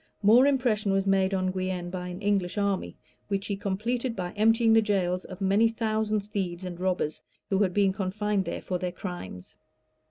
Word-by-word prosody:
More 235 +7 +7
impression 240 -7 +1
was 195 0 +1
made 195 -1 +2
on 185 -1 0
Guienne 185 -1 -3
by 180 -1 -4
an 180 +3 -7
English 200 -2 0
army, 200 -2 -1 0.3
which 195 -1 -2
he 200 - -2
completed 230 +5 -2
by 180 -3 -4
emptying 225 +2 +3
the 225 - +6
jails 185 -4 0
of 185 -1 -10
many 200 +4 +4
thousand 220 -2 0
thieves 190 -3 -4
and 175 -1 -6
robbers, 180 -4 -1 0.3
who 195 - +2
had 195 -3 +2
been 195 0 +2
confined 200 +1 -1
there - - -4
for 180 -1 -2
their 180 0 -2
crimes. 175 - -8
195 Hz, 185 wpm, -27 LUFS, 185-215 Hz, 0.3 s, More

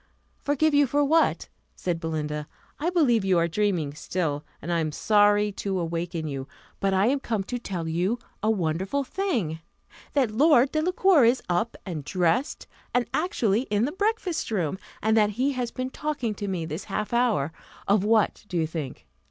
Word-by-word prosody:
"Forgive 295 +2 +2
you 285 -1 +5
for 290 +3 +2
what?" 320 +3 +2 0.3
said 175 -2 -2
Belinda; 150 -2 -3 0.3
"I 320 +4 0
believe 270 - +3
you 190 -2 +3
are 170 0 +3
dreaming 170 -5 0
still, 150 -2 -2 0.2
and 170 +4 -3
I 170 - +2
am 155 -1 -1
sorry 205 +4 +3
to 195 -1 -3
awaken 165 -1 -3
you; 135 -2 -5 0.3
but 195 - +1
I 190 +1 +3
am 275 +4 +2
come 220 -6 -2
to 245 +5 -4
tell 180 -7 -4
you 180 +8 0 0.2
a 215 - +1
wonderful 190 - 0
thing 250 - -2 0.5
that 265 -6 +2
Lord 270 +2 +5
Delacour 350 0 +3
is 240 +3 +3
up, 180 +7 0
and 165 -6 -4
dressed, 180 - 0 0.3
and 245 -1 +3
actually 245 - +1
in 210 +2 +2
the 285 - -2
breakfast 405 -2 -1
room; 190 -5 -1 0.2
and 220 +1 +3
that 210 -2 +4
he 270 +3 +2
has 250 -3 -2
been 255 +1 -4
talking 285 -8 -2
to 205 0 -5
me 180 -4 -2
this 160 +4 -5
half 210 +2 -3
hour 230 - +2 0.4
of 200 -1 +3
what 215 0 +2
do 180 - -3
you 160 - +2
think? 155 -4 -6
205 Hz, 180 wpm, -26 LUFS, 170-260 Hz, 0.5 s, you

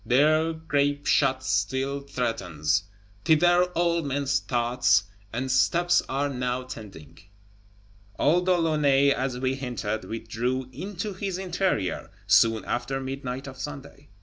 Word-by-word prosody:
There 155 +5 +3
grape 145 -2 -1
shot 130 -2 +2
still 130 +6 0
threatens; 95 - -1 0.4
thither 175 +3 +4
all 170 0 +2
men's 140 -1 0
thoughts 120 -4 +2 0.3
and 130 +3 -2
steps 175 +7 +3
are 140 +2 0
now 125 -2 -2
tending. 100 - -11 1.0
Old 175 +5 +2
De 180 -1 +4
Launay, 145 -4 +3
as 130 -2 -1
we 130 +1 0
hinted, 120 -5 -4
withdrew 120 +3 -3
"into 195 - -5
his 190 -1 -4
interior" 180 - -1 0.2
soon 110 +2 +4
after 125 +3 -2
midnight 135 -1 -5
of 135 -1 -9
Sunday. 145 -1 -8
135 Hz, 120 wpm, -26 LUFS, 120-155 Hz, 1.0 s, thither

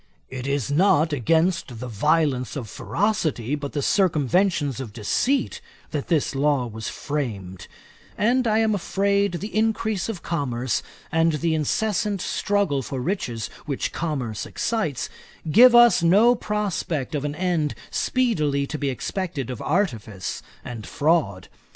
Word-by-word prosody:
It 130 0 -5
is 140 -1 -1
not 160 -1 +3
against 160 -1 +1
the 125 - -5
violence 140 +3 +1
of 130 -6 -4
ferocity, 160 - -1
but 145 -1 -3
the 145 - -1
circumventions 165 - +2
of 120 -6 -6
deceit, 245 - 0 0.3
that 145 -3 -3
this 155 -5 +1
law 140 -2 +1
was 110 -2 -5
framed; 105 -11 -4 0.5
and 240 +3 +2
I 215 -1 +3
am 220 -1 +3
afraid 200 0 +1
the 200 +5 -5
increase 220 -2 0
of 200 -6 -5
commerce, 130 -7 -1 0.3
and 165 0 +3
the 160 +2 0
incessant 205 +6 0
struggle 200 -7 0
for 135 0 -5
riches 125 - -2 0.2
which 140 -3 -2
commerce 130 -10 -3
excites, 210 - -2 0.4
give 240 +7 +8
us 240 -6 +7
no 205 +8 +5
prospect 195 - -2
of 145 -2 -1
an 145 0 -3
end 170 -4 0 0.2
speedily 155 - +1
to 150 +2 -5
be 140 - 0
expected 145 - -3
of 125 - -6
artifice 115 - -2 0.2
and 115 -3 -7
fraud. 145 - +1
155 Hz, 140 wpm, -24 LUFS, 130-200 Hz, 0.5 s, give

